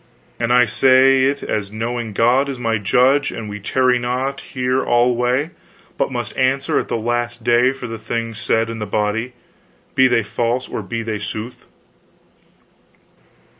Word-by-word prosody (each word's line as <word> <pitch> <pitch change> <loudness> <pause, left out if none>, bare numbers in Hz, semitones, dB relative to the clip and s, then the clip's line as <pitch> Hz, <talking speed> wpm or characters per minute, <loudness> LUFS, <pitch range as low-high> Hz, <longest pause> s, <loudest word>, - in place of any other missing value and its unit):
"And 120 0 0
I 125 0 +5
say 130 +3 +4
it 140 +1 -1
as 100 -2 -3
knowing 115 +1 -3
God 125 +6 +2
is 135 - -4
my 115 -2 -1
judge, 130 +8 +2
and 110 - -6
we 105 0 -6
tarry 125 +4 +1
not 130 +3 -2
here 130 0 -1
alway, 125 +5 +1 0.4
but - - -1
must - - -4
answer 130 +1 +1
at - - -4
the - - -1
last 120 +1 -2
day 120 +2 +4
for 135 -2 -8
the 115 -1 -6
things 115 0 -4
said 115 0 0
in 115 - -6
the 105 - -4
body, 105 +4 -1 0.6
be 130 - +5
they 120 -2 +2
false 120 +4 -2
or - - -4
be 115 +4 -4
they 110 -2 -3
sooth." 110 +4 -6
120 Hz, 165 wpm, -19 LUFS, 115-130 Hz, 0.6 s, I